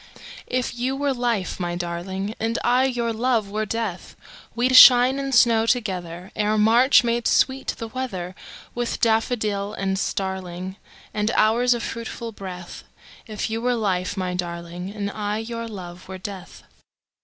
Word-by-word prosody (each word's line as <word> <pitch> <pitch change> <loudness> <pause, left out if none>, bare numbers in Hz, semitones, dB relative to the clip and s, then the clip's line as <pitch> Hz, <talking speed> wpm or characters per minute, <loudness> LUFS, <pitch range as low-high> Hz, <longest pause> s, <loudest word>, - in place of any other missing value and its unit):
If 250 -1 -1
you 250 +3 -2
were 280 0 0
life, 235 -8 -1
my 175 -1 -2
darling, 180 +4 -4
And 225 +1 -1
I 250 +2 +3
your 240 -3 -1
love 225 -3 0
were 215 +1 -2
death, 220 -5 -4 0.4
We'd 250 +2 +2
shine 255 +1 +9
and 275 0 -3
snow 230 -3 +4
togetherEre 195 -1 -1
March 235 +6 +5
made 235 0 0
sweet 265 0 +1
the 230 - -5
weatherWith 235 0 -5
daffodil 215 -3 0
and 190 0 -1
starlingAnd 190 +2 -4
hours 240 +3 +3
of 235 - -4
fruitful 230 0 -5
breath; 180 -4 -8 0.4
If 215 0 -4
you 225 +1 -2
were 245 +1 +1
life, 195 -4 -1
my 185 -1 -2
darling, 175 0 -5
And 205 -1 -4
I 210 0 -3
your 230 +1 -5
love 180 -4 -9
were 190 0 -7
death. 185 -1 -9
215 Hz, 145 wpm, -23 LUFS, 190-240 Hz, 0.4 s, shine